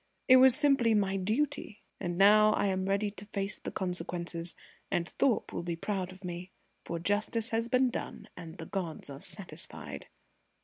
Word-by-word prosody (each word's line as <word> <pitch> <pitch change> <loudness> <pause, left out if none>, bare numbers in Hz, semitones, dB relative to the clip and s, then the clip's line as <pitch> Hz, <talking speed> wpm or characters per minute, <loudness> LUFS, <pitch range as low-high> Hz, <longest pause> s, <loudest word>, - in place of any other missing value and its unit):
"It 255 - +9
was 260 -1 +7
simply 270 -6 +4
my 195 -2 +1
duty! 220 +4 -2 0.2
And 175 -2 -3
now 215 +2 +7
I - - +1
am 190 -1 0
ready 200 +1 +1
to 200 0 -11
face 200 -1 -3
the - - -5
consequences, 175 -2 -3 0.3
and 170 -1 0
Thorpe 250 +3 0
will - - -2
be 170 -1 -3
proud 185 +1 -3
of 185 +1 -14
me. 175 +1 -5 0.3
For 170 - -4
justice 210 +5 0
has 230 +1 0
been 255 0 +3
done - - -6
and 165 -2 -9
the 160 - -7
gods 165 -6 -4
are 135 - -8
satisfied." 195 +3 -6
195 Hz, 175 wpm, -31 LUFS, 175-225 Hz, 0.3 s, It